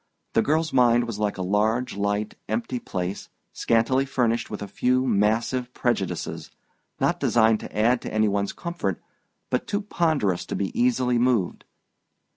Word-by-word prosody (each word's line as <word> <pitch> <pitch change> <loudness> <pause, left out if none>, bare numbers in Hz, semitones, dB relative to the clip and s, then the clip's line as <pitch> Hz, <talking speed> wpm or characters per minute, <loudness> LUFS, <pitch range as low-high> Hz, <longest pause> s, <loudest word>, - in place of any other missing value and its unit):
The - - +4
girl's 160 +4 0
mind 120 -2 +4
was 115 -3 -5
like 105 -2 -1
a 95 - -2
large 110 +6 +1
light 100 +1 -1 0.2
empty 115 +3 -2
place, 95 -2 -4 0.2
scantily 115 +4 +2
furnished 120 -3 0
with 105 -1 -5
a - - -6
few 125 +5 +1
massive 115 +3 +1
prejudices, 115 -7 -2 0.5
not - - +1
designed 110 -2 +3
to - - -9
add 120 +3 +3
to - - -6
any 110 0 +2
one's 100 0 0
comfort 170 - -3 0.5
but 125 - 0
too 205 - -1
ponderous 155 - 0
to - - -3
be 95 - -2
easily 125 0 +2
moved. 120 -7 +1
115 Hz, 155 wpm, -25 LUFS, 105-125 Hz, 0.5 s, The